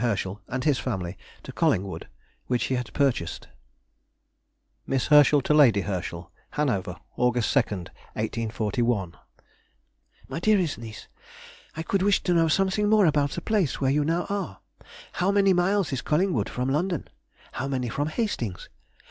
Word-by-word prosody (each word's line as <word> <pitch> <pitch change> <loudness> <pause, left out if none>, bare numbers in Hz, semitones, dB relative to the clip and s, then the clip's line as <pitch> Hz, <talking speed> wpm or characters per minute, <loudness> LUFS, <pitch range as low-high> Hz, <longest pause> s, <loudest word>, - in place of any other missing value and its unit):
Herschel 100 -3 -1
and 130 0 -3
his 145 -3 +2
family 95 -7 -3 0.3
to - - -8
Collingwood, 95 +1 0 0.4
which 125 -1 0
he - - -1
had 125 -2 -2
purchased:— 130 - -1 1.4
MISS 135 -2 0
HERSCHEL 150 -1 +6
TO 150 - +2
LADY 125 -9 +6
HERSCHEL. 90 -2 -5 0.2
HANOVER, 130 -11 -1 0.2
August 125 -2 +1
2, 140 - +6
1841. 110 0 -2 1.1
MY - - -4
DEAREST 185 - +2
NIECE,—... 110 -3 -9 0.7
I 160 - -2
could 195 +3 0
wish 200 +1 +2
to 180 - +1
know 165 -1 +4
something 195 +5 +2
more 215 -2 +5
about 145 -3 +2
the - - -4
place 205 -10 0
where 135 -1 +2
you 150 +1 +2
now 165 +4 0
are. 190 - -4 0.5
How 180 +2 0
many 200 -1 +4
miles 185 -2 +1
is 130 - -1
Collingwood 150 - +1
from 125 +1 -2
London? 170 +4 -1 0.4
How - - -3
many 130 -3 -2
from 145 +5 -2
Hastings? 155 - -3
135 Hz, 150 wpm, -26 LUFS, 115-175 Hz, 1.4 s, HERSCHEL